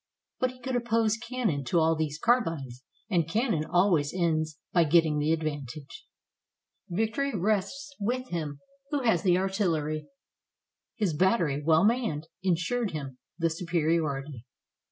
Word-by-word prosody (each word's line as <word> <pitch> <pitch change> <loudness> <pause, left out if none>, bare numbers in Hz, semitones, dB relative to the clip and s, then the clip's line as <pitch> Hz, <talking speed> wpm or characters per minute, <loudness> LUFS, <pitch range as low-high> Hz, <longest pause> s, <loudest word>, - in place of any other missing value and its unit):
But 255 - +2
he 255 0 -13
could 255 +1 -3
oppose 230 -2 +2
cannon 225 - -2
to 150 - +1
all 160 0 +3
these 155 -2 -2
carbines, 165 - 0 0.2
and 170 -6 +1
cannon 215 - +1
always 170 -4 +2
ends 160 -3 0 0.2
by 175 - +5
getting 160 -1 +3
the 150 +2 +1
advantage. 150 -3 -4 0.8
Victory 225 +8 -1
rests 215 - -1
with 250 +5 -2
him 150 -5 -4 0.3
who 290 -3 -1
has 220 -8 +3
the 180 -1 +3
artillery. 170 -6 -1 0.9
His 205 -7 0
battery, 165 -4 +2
well 160 +2 +4
manned, 210 -9 +1
insured 190 +6 0
him 135 -4 -6 0.2
the 165 -1 +1
superiority. 155 -6 -1
170 Hz, 135 wpm, -28 LUFS, 155-220 Hz, 0.9 s, by